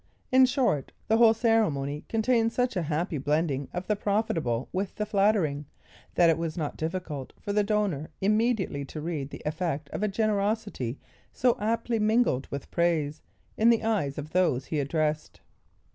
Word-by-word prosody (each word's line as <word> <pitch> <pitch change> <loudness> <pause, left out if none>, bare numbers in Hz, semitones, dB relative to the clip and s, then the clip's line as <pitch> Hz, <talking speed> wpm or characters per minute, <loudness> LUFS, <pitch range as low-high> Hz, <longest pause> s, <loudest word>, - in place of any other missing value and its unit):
In 260 0 +7
short, 245 - 0 0.2
the 220 - +4
whole 225 -1 +6
ceremony 160 - +1
contained 230 0 +2
such 250 -1 0
a 180 - +1
happy 160 0 -2
blending 145 -1 0
of 180 +1 -4
the 210 - +1
profitable 165 - -1
with 190 +1 -2
the 210 - -2
flattering, 195 -9 +1 0.5
that 175 - +5
it 165 0 +3
was 165 -1 -3
not 150 -4 -3
difficult 160 -5 -4
for 205 - -4
the 210 0 +3
donor 200 -8 -1
immediately 210 -7 +1
to 155 - -7
read 150 -3 -3
the - - -9
effect 155 -2 -2
of - - -4
a 210 - +2
generosity 205 - -1 0.3
so 245 -1 +2
aptly 230 +2 0
mingled 215 - +2
with 140 -1 -6
praise, 160 -3 0 0.4
in 225 +2 +5
the 230 -1 +3
eyes 200 -12 0
of 150 +1 -6
those 175 -8 +2
he 155 - -2
addressed. 150 +2 -1
180 Hz, 165 wpm, -27 LUFS, 150-220 Hz, 0.5 s, In